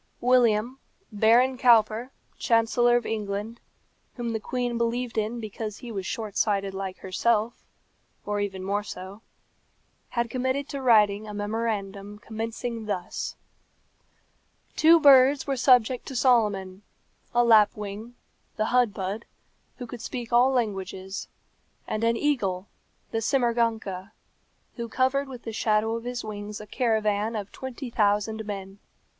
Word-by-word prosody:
William, 245 Hz, 0 st, +3 dB, 0.3 s
Baron 235 Hz, +5 st, +3 dB
Cowper, 230 Hz, 0 st, +4 dB, 0.3 s
Chancellor 240 Hz, +1 st, +3 dB
of 240 Hz, -, -3 dB
England, 210 Hz, +1 st, -4 dB, 0.6 s
whom 235 Hz, -2 st, -3 dB
the 220 Hz, -, -1 dB
queen 245 Hz, +2 st, -2 dB
believed 235 Hz, +1 st, -1 dB
in 220 Hz, +2 st, -1 dB
because 215 Hz, -1 st, -6 dB
he 245 Hz, -, -9 dB
was 195 Hz, -3 st, -4 dB
short 215 Hz, -3 st, -4 dB
sighted 200 Hz, -3 st, +1 dB
like 190 Hz, -1 st, -5 dB
herself, 220 Hz, +4 st, 0 dB, 0.6 s
or 205 Hz, 0 st, -1 dB
even 195 Hz, -2 st, -3 dB
more 200 Hz, +2 st, 0 dB
so, 195 Hz, 0 st, -9 dB, 0.9 s
had 235 Hz, -1 st, -1 dB
committed 260 Hz, +2 st, -1 dB
to 280 Hz, -, -4 dB
writing 215 Hz, -4 st, +4 dB
a 210 Hz, -, -7 dB
memorandum 205 Hz, -1 st, -3 dB
commencing 225 Hz, +1 st, -5 dB
thus: 180 Hz, -4 st, -4 dB, 1.4 s
"Two 330 Hz, +2 st, +6 dB
birds 275 Hz, -1 st, +6 dB
were 275 Hz, -, -1 dB
subject 250 Hz, -1 st, +3 dB
to 265 Hz, -, -6 dB
Solomon 210 Hz, -7 st, +2 dB, 0.5 s
a 240 Hz, -1 st, +3 dB
lapwing, 215 Hz, 0 st, +2 dB, 0.4 s
the 215 Hz, 0 st, -1 dB
hudbud, 210 Hz, -3 st, 0 dB, 0.5 s
who 250 Hz, -, -6 dB
could 240 Hz, 0 st, -9 dB
speak 240 Hz, -1 st, -6 dB
all 245 Hz, +2 st, +6 dB
languages; 195 Hz, -6 st, -3 dB, 0.6 s
and 215 Hz, -, -2 dB
an 230 Hz, 0 st, +2 dB
eagle, 205 Hz, -10 st, 0 dB, 0.5 s
the 225 Hz, -, -1 dB
simourganka, 230 Hz, -6 st, 0 dB, 0.6 s
who 235 Hz, -1 st, -4 dB
covered 265 Hz, +3 st, +1 dB
with 250 Hz, -3 st, -9 dB
the 225 Hz, -, -6 dB
shadow 215 Hz, 0 st, +1 dB
of 230 Hz, +1 st, -6 dB
his 245 Hz, -1 st, -4 dB
wings 210 Hz, -1 st, -6 dB
a 210 Hz, -, -9 dB
caravan 220 Hz, -1 st, 0 dB
of 205 Hz, -2 st, -5 dB
twenty 260 Hz, -1 st, -7 dB
thousand 210 Hz, 0 st, +1 dB
men. 195 Hz, -1 st, -6 dB
225 Hz, 130 wpm, -26 LUFS, 205-245 Hz, 1.4 s, Two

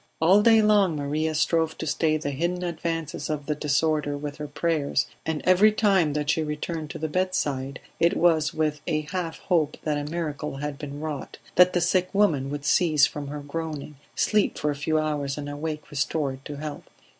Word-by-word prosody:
All 185 Hz, +6 st, +5 dB
day 225 Hz, 0 st, +6 dB
long 205 Hz, -5 st, +4 dB
Maria 150 Hz, +2 st, -1 dB
strove 160 Hz, +2 st, +1 dB
to -, -, -4 dB
stay 155 Hz, 0 st, +1 dB
the 145 Hz, -2 st, -3 dB
hidden 175 Hz, +6 st, -2 dB
advances 165 Hz, -2 st, -3 dB
of 150 Hz, -2 st, -3 dB
the 150 Hz, -, 0 dB
disorder 150 Hz, 0 st, 0 dB
with 145 Hz, 0 st, -6 dB
her 150 Hz, -, -5 dB
prayers, 145 Hz, -2 st, 0 dB, 0.2 s
and 160 Hz, -2 st, -2 dB
every 185 Hz, +4 st, +6 dB
time 195 Hz, -8 st, +2 dB
that 150 Hz, 0 st, 0 dB
she 160 Hz, -, 0 dB
returned 155 Hz, +1 st, -4 dB
to -, -, -6 dB
the 160 Hz, -, -2 dB
bedside 145 Hz, -6 st, -1 dB, 0.2 s
it 170 Hz, -, +3 dB
was 165 Hz, -2 st, +3 dB
with 155 Hz, -1 st, -1 dB
a 155 Hz, -, +1 dB
half 175 Hz, -3 st, -3 dB
hope 160 Hz, -5 st, +1 dB
that 150 Hz, -2 st, 0 dB
a 145 Hz, +1 st, -5 dB
miracle 150 Hz, -4 st, -3 dB
had 140 Hz, 0 st, -5 dB
been 145 Hz, -1 st, -6 dB
wrought, 150 Hz, -3 st, -5 dB, 0.2 s
that 180 Hz, 0 st, +6 dB
the 175 Hz, -, +2 dB
sick 180 Hz, +1 st, +2 dB
woman 155 Hz, -10 st, +2 dB
would 145 Hz, 0 st, -5 dB
cease 155 Hz, -3 st, +4 dB
from 145 Hz, -1 st, -5 dB
her 145 Hz, +1 st, -5 dB
groaning, 150 Hz, 0 st, -5 dB, 0.2 s
sleep 210 Hz, -1 st, +2 dB
for 150 Hz, -, 0 dB
a -, -, -4 dB
few 155 Hz, +2 st, 0 dB
hours 150 Hz, -3 st, -1 dB
and 145 Hz, -1 st, -5 dB
awake 150 Hz, +2 st, -5 dB
restored 140 Hz, -2 st, -2 dB
to 145 Hz, -, -6 dB
health. 150 Hz, 0 st, -7 dB
155 Hz, 195 wpm, -25 LUFS, 145-170 Hz, 0.2 s, day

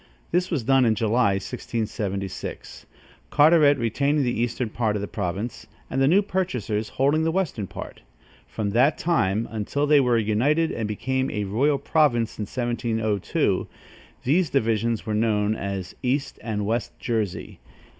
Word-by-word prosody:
This 180 Hz, +1 st, +1 dB
was 150 Hz, -9 st, -1 dB
done 135 Hz, +2 st, +4 dB
in 115 Hz, -2 st, +3 dB
July, 115 Hz, -1 st, +2 dB
1676, 100 Hz, -2 st, -4 dB, 0.4 s
Carteret 150 Hz, -1 st, +5 dB
retaining 140 Hz, +5 st, +1 dB
the 125 Hz, -, +1 dB
eastern 120 Hz, -1 st, -2 dB
part 110 Hz, -3 st, 0 dB
of 105 Hz, -, -2 dB
the -, -, -3 dB
province, 100 Hz, +4 st, -4 dB, 0.2 s
and 135 Hz, -, 0 dB
the 135 Hz, -, +4 dB
new 190 Hz, +7 st, +4 dB
purchasers 125 Hz, -, -2 dB
holding 145 Hz, +4 st, +1 dB
the 165 Hz, -, +1 dB
western 160 Hz, -, -2 dB
part. -, -, -9 dB, 0.5 s
From 100 Hz, -, -3 dB
that 130 Hz, +8 st, +3 dB
time, 115 Hz, -, +1 dB
until 115 Hz, +7 st, -1 dB
they 145 Hz, 0 st, +5 dB
were 125 Hz, -3 st, +3 dB
united 125 Hz, +10 st, +2 dB
and 110 Hz, -2 st, -3 dB
became 130 Hz, +5 st, -1 dB
a 105 Hz, -, -2 dB
royal 130 Hz, +9 st, +1 dB
province 135 Hz, -6 st, +1 dB
in 105 Hz, -, -2 dB
1702, 115 Hz, -4 st, -1 dB, 0.6 s
these 160 Hz, +5 st, +2 dB
divisions 115 Hz, -3 st, 0 dB
were 110 Hz, -, -2 dB
known 105 Hz, -1 st, +1 dB
as 100 Hz, -3 st, -4 dB
East 135 Hz, +3 st, -1 dB
and 105 Hz, -3 st, -3 dB
West 115 Hz, +3 st, -2 dB
Jersey. 110 Hz, -6 st, -3 dB
115 Hz, 150 wpm, -24 LUFS, 105-140 Hz, 0.6 s, Carteret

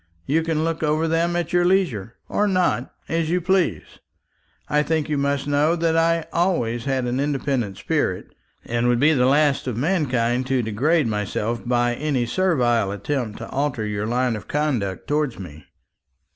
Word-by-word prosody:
You 155 Hz, +4 st, +2 dB
can 160 Hz, -1 st, -1 dB
look 165 Hz, 0 st, -2 dB
over 155 Hz, +1 st, +1 dB
them 165 Hz, +2 st, +1 dB
at 175 Hz, -1 st, -2 dB
your 175 Hz, 0 st, +4 dB
leisure, 160 Hz, -, +1 dB
or 210 Hz, -, +1 dB
not, 185 Hz, -2 st, +1 dB, 0.2 s
as 165 Hz, -1 st, -1 dB
you 180 Hz, +2 st, +2 dB
please. 180 Hz, -, +1 dB, 0.8 s
I 150 Hz, 0 st, +2 dB
think 155 Hz, 0 st, -1 dB
you 150 Hz, -, 0 dB
must 140 Hz, 0 st, 0 dB
know 145 Hz, +3 st, +2 dB
that 165 Hz, -1 st, +1 dB
I 165 Hz, 0 st, +2 dB
always 120 Hz, -10 st, 0 dB
had 135 Hz, -2 st, 0 dB
an 125 Hz, +2 st, -1 dB
independent 135 Hz, -7 st, -1 dB
spirit, -, -, -2 dB, 0.3 s
and 120 Hz, +1 st, 0 dB
would 120 Hz, -1 st, +2 dB
be 155 Hz, +4 st, +5 dB
the 125 Hz, -3 st, +3 dB
last 145 Hz, 0 st, +2 dB
of 120 Hz, -4 st, -2 dB
mankind 130 Hz, -6 st, 0 dB
to 130 Hz, -2 st, +1 dB
degrade 140 Hz, +9 st, +1 dB
myself 105 Hz, +1 st, -2 dB
by 120 Hz, 0 st, +2 dB
any 135 Hz, -2 st, -1 dB
servile 120 Hz, -, +1 dB
attempt 110 Hz, +2 st, -3 dB
to 115 Hz, -, -8 dB
alter 135 Hz, -5 st, -1 dB
your 105 Hz, 0 st, -2 dB
line 125 Hz, 0 st, 0 dB
of 105 Hz, -, -8 dB
conduct 130 Hz, -11 st, -1 dB
towards 145 Hz, -4 st, 0 dB
me." 80 Hz, -5 st, -10 dB
140 Hz, 170 wpm, -22 LUFS, 120-160 Hz, 0.8 s, be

